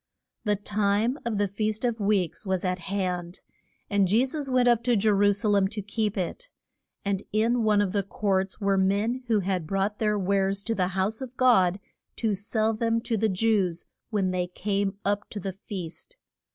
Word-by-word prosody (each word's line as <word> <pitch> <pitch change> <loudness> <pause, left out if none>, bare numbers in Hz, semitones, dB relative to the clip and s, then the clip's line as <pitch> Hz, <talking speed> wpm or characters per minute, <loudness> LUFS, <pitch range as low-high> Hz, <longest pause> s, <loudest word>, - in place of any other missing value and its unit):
The 210 -1 +2
time 205 +5 +1
of 230 -3 -1
the 205 0 +2
Feast 215 +3 -2
of 235 -2 -1
Weeks 200 -4 0
was 190 -2 -1
at 180 0 -1
hand, 180 -1 -3 0.5
and 200 -3 +2
Je 225 +7 +3
sus 280 +1 -3
went 255 -1 +3
up 240 -1 +4
to 245 -1 +3
Je 215 +1 +1
ru 205 0 +4
sa 205 +2 +1
lem 200 -2 +3
to 210 +2 -4
keep 210 0 -2
it. 485 - -4 0.6
And 200 -1 0
in 230 +3 +2
one 210 -1 +4
of 200 -3 0
the 200 - +1
courts 195 -1 -1
were 195 -2 +2
men 205 +6 +1
who 220 -3 +2
had 185 -4 -2
brought 195 +3 -1
their 210 -1 +1
wares 195 0 +1
to 230 - -1
the 185 -4 +1
house 210 +6 0
of 255 -1 -7
God 195 -7 +4 0.4
to 220 -3 0
sell 215 +3 0
them 230 +1 0
to 230 - -1
the 220 +1 +1
Jews 190 -4 +1 0.2
when 200 -4 0
they 180 -1 -1
came 195 +2 -2
up 205 +1 0
to 210 - -5
the 195 0 -4
feast. 190 - -7
205 Hz, 195 wpm, -26 LUFS, 190-220 Hz, 0.6 s, up